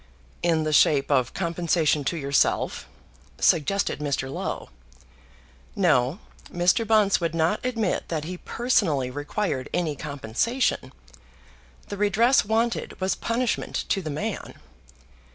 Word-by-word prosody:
"In 165 -2 +2
the 155 0 -1
shape 145 -1 +4
of 130 -3 +1
compensation 170 -4 +1
to 170 - -1
yourself," 140 -2 0 0.5
suggested 170 +4 +2
Mr. 140 -2 -2
Low. 185 +3 -4 1.1
No; 155 - +2 0.3
Mr. 180 +6 +2
Bunce 210 -3 +3
would 165 -1 -1
not 165 +6 +1
admit 230 -6 -1
that 155 -3 -2
he 180 +3 -6
personally 165 - 0
required 145 0 -3
any 165 -4 -1
compensation. 145 - -1 1.0
The 205 - -5
redress 215 +6 +3
wanted 225 +3 -1
was 190 0 +1
punishment 235 +1 -2
to 195 - +1
the 160 - -5
man. 150 +1 -4
170 Hz, 115 wpm, -25 LUFS, 145-210 Hz, 1.1 s, shape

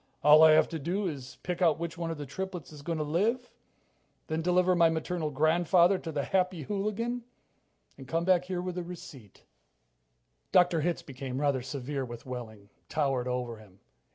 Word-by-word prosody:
"All 150 +2 +8
I 160 -1 +8
have 155 - +5
to 165 - -4
do 185 +7 -1
is 135 -6 -7
pick 180 0 -3
out 165 -4 +4
which 170 0 -4
one 165 0 -4
of 165 - -4
the 145 - -6
triplets 180 +2 -6
is 150 -2 -11
going 165 +2 -3
to 155 - -1
live, 215 +12 0 0.7
then 160 +1 -2
deliver 180 +1 +3
my 170 -1 +5
maternal 160 0 -2
grandfather 170 +5 +3
to 165 - -6
the 145 -2 -2
Happy 185 -2 0
Hooligan, 215 - -2 0.8
and 135 - -10
come 165 +4 -1
back 180 -1 +3
here 180 -1 -3
with 180 0 -3
a - - -4
receipt." 145 - -11 1.1
Dr. 175 -3 +4
Hitz 170 +2 -1
became 130 -1 -6
rather 140 -3 +1
severe 135 +1 -4
with 120 -2 -8
Wehling, 110 -5 -8 0.2
towered 135 -5 0
over 125 -2 -3
him. 100 -3 -18
160 Hz, 180 wpm, -29 LUFS, 135-180 Hz, 1.1 s, All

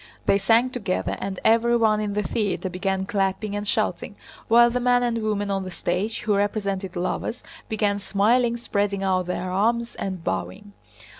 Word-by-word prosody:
They 200 - +3
sang 230 +5 +3
together 205 -7 -2
and 190 -2 -4
everyone 225 -1 +4
in 205 -1 -2
the 210 - 0
theater 200 -4 -2
began 190 +1 -1
clapping 200 0 -1
and 205 0 -4
shouting, - - -1 0.3
while 235 +1 +6
the 250 - 0
man 245 0 +3
and 235 -2 0
woman 205 -2 -1
on 195 -1 -1
the 185 - -6
stage—who 200 +5 -2
represented 200 -1 -1
lovers—began 210 - -2
smiling, 230 +5 +2
spreading 200 -3 -1
out 185 -2 +1
their 180 0 -3
arms, 235 +5 +1
and 185 -3 -5
bowing. 205 +4 -4
205 Hz, 155 wpm, -24 LUFS, 195-230 Hz, 0.3 s, while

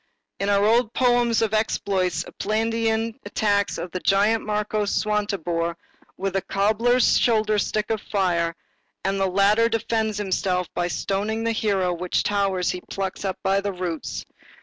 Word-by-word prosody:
In 200 - 0
our 200 0 +3
old 230 +1 +3
poems 240 -3 +3
of 220 -1 -1
exploits, 190 -5 0
Esplandian 225 +2 -1
attacks 205 -2 0
the 180 +2 -5
giant 210 +3 +3
marquis 210 0 -1
Swantibore 195 -6 -1 0.4
with 195 0 -3
a 195 - +2
cobbler's 220 +6 +2
shoulder 215 -2 +2
stick 215 +2 -1
of 220 -1 -1
fire, 170 -4 0 0.5
and 195 0 0
the 195 - +2
latter 205 +5 +3
defends 225 -1 -1
himself 185 -3 -1
by 175 0 0
stoning 205 +5 -2
the 230 - +1
hero 200 -5 0
with 180 +1 -6
towers 195 -3 0
which 180 - -6
he - - -29
plucks 195 0 -4
up 190 -1 -2
by 195 +1 +2
the 200 0 -2
roots. 180 -4 -4
205 Hz, 150 wpm, -24 LUFS, 190-220 Hz, 0.5 s, our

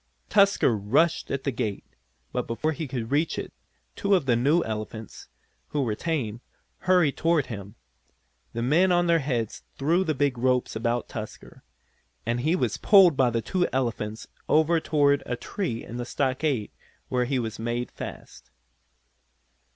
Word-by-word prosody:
Tusker 200 - +4
rushed 125 +12 +1
at 135 -1 -2
the 140 - 0
gate, 105 -4 -3 0.5
but 125 - -2
before 135 +7 -1
he 160 0 -4
could 125 -3 -4
reach 150 +3 +1
it - - -5 0.4
two 200 0 +2
of 175 -7 +1
the 125 -3 +3
new 145 +9 +3
elephants, 110 0 -6 0.4
who 145 -2 -1
were 115 -4 -1
tame, 120 -5 -2 0.4
hurried 180 -6 +3
toward 165 -4 +2
him. 100 -3 -8 0.8
The 115 - -2
men 170 +9 +4
on 175 0 +3
their 170 -1 +4
heads 125 -7 -2 0.2
threw 165 +7 +2
the 155 -5 -1
big 135 -3 0
ropes 125 -1 +1
about 115 +2 -1
Tusker, 110 -2 -9 0.6
and 115 +1 0
he 155 +8 +2
was - - 0
pulled 190 -6 +6
by 130 -2 +3
the 115 -1 -1
two 180 - 0
elephants 115 -4 -2 0.2
over 160 +2 +4
toward 145 -3 +2
a 125 - -1
tree 120 - -4
in 120 - -7
the 120 - -3
stockade, 130 -3 -1 0.4
where 125 -1 +1
he 135 +2 0
was 115 -3 -3
made 120 +2 -2
fast. - - -9
130 Hz, 160 wpm, -26 LUFS, 115-160 Hz, 0.8 s, pulled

